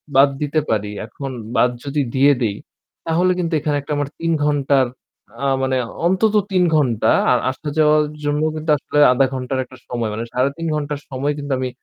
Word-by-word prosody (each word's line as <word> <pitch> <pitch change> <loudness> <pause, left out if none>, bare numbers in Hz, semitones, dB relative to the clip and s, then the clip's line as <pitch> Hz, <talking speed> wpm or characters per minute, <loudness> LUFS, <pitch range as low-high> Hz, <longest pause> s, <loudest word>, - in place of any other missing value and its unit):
বাদ 140 +1 +7
দিতে 150 +1 +1
পারি। 105 -2 0 0.2
এখন 135 +5 -7 0.3
বাদ 125 - +4 0.2
যদি 145 +1 -1
দিয়ে 140 +2 +5
দেই, 105 -4 0 0.5
তাহলে 175 +3 +2
কিন্তু 170 -1 -1
এখানে 150 0 -1
একটা 145 - -9
আমার 145 -1 -2
৩ 165 0 0
ঘণ্টার 140 -2 +2 0.6
আ - - +1 0.2
মানে 130 0 +1 0.3
অন্তত 195 +4 +2 0.2
৩ 185 -1 +3
ঘণ্টা 120 -7 +2 0.2
আর 125 - +4
আসা 150 +4 -10
যাওয়ার 150 0 +4 0.2
জন্য 145 +1 0
কিন্তু 155 +1 -6
আসলে 145 - -4
০.৫ 130 +2 +3
ঘণ্টার 130 0 -3
একটা 130 0 -15
সময় 120 -3 -2
মানে 115 - -3
৩.৫ 140 +6 -1
ঘণ্টার 145 -1 -3
সময় 140 +2 -1
কিন্তু 145 -1 -5
আমি 130 - -2
140 Hz, 185 wpm, -20 LUFS, 130-150 Hz, 0.6 s, বাদ